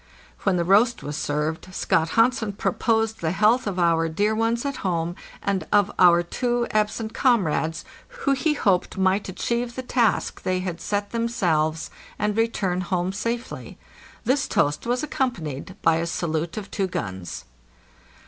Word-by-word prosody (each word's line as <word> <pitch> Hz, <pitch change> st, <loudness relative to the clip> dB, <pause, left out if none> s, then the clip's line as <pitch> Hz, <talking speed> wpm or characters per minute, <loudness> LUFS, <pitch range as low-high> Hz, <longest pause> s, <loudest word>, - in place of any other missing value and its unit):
When -, -, +1 dB
the 170 Hz, -, +1 dB
roast 215 Hz, +6 st, +4 dB
was 145 Hz, +1 st, -4 dB
served 155 Hz, +5 st, -2 dB
Scott 160 Hz, 0 st, +1 dB
Hansen 230 Hz, -2 st, +3 dB
proposed 225 Hz, +2 st, 0 dB
the 160 Hz, -, 0 dB
health 215 Hz, +5 st, +3 dB
of 195 Hz, -2 st, -2 dB
our 165 Hz, -2 st, +2 dB
dear 205 Hz, +7 st, +1 dB
ones 230 Hz, +3 st, 0 dB
at 280 Hz, -1 st, -2 dB
home 170 Hz, -2 st, -1 dB, 0.3 s
and 200 Hz, -2 st, -1 dB
of 205 Hz, -2 st, +4 dB
our 175 Hz, -1 st, +6 dB
two 240 Hz, +6 st, -1 dB
absent 215 Hz, +1 st, 0 dB
comrades, 165 Hz, -, +1 dB, 0.2 s
who 485 Hz, -, -2 dB
he 300 Hz, +3 st, +1 dB
hoped 190 Hz, -9 st, +1 dB
might 190 Hz, +1 st, +1 dB
achieve 235 Hz, +5 st, -2 dB
the 260 Hz, -, -4 dB
task 240 Hz, -4 st, +1 dB
they 185 Hz, 0 st, 0 dB
had 180 Hz, -2 st, -4 dB
set 205 Hz, 0 st, -2 dB
themselves 165 Hz, -9 st, 0 dB, 0.3 s
and 210 Hz, 0 st, 0 dB
return 205 Hz, -5 st, 0 dB
home 185 Hz, 0 st, -1 dB
safely. 230 Hz, +4 st, -4 dB, 0.5 s
This 270 Hz, +2 st, +1 dB
toast 145 Hz, +10 st, 0 dB
was 245 Hz, +3 st, 0 dB
accompanied 190 Hz, -, -3 dB
by 165 Hz, 0 st, +4 dB
a 165 Hz, +1 st, -1 dB
salute 165 Hz, 0 st, -2 dB
of 200 Hz, -2 st, -6 dB
two 195 Hz, -2 st, 0 dB
guns. 95 Hz, -, -5 dB
200 Hz, 155 wpm, -24 LUFS, 170-230 Hz, 0.5 s, our